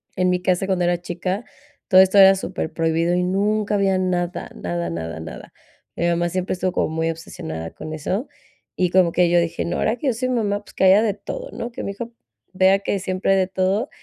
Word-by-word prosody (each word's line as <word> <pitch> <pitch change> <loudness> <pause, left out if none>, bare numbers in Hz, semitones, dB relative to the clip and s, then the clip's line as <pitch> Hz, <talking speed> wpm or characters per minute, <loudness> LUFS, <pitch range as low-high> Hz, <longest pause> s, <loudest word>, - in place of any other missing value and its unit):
en 185 0 +2
mi 180 0 0
casa 180 +1 +1
cuando 185 -2 +1
era 175 0 +1
chica 180 +4 -3 0.4
todo 185 0 +8
esto 190 +1 +3
era 195 -1 +9
superprohibido 165 -2 -1
y 180 - +1
nunca 205 +3 0
había 195 -1 +2
nada, 180 -1 -2
nada, 85 -1 -3
nada, 80 -1 -5
nada, 80 +1 -9 0.4
mi 170 - 0
mamá 170 0 +1
siempre 185 +1 -2
estuvo 185 0 -1
como - - 0
muy 160 +1 -1
obsesionada 80 - -7
con 155 - -8
eso 185 - -3 0.5
y 180 -1 +1
como 180 -1 +4
que 175 0 +3
yo 175 0 +4
dije 170 0 -1
no, 170 - -2
ahora 220 +2 0
que 280 - -3
yo 260 - +3
soy 255 +3 -2
mamá, 210 -4 0
pues, - - -17
que - - +1
haya 195 +3 +6
de 215 -3 +1
todo, - - -7
¿no?, 235 - -5
que - - -6
mi - - -3
hijo 230 +4 -7 0.4
vea 190 +1 +5
que 200 0 -2
siempre 185 0 -1
hay - - +3
de 185 - +1
todo, 190 +6 0
185 Hz, 220 wpm, -22 LUFS, 170-200 Hz, 0.5 s, era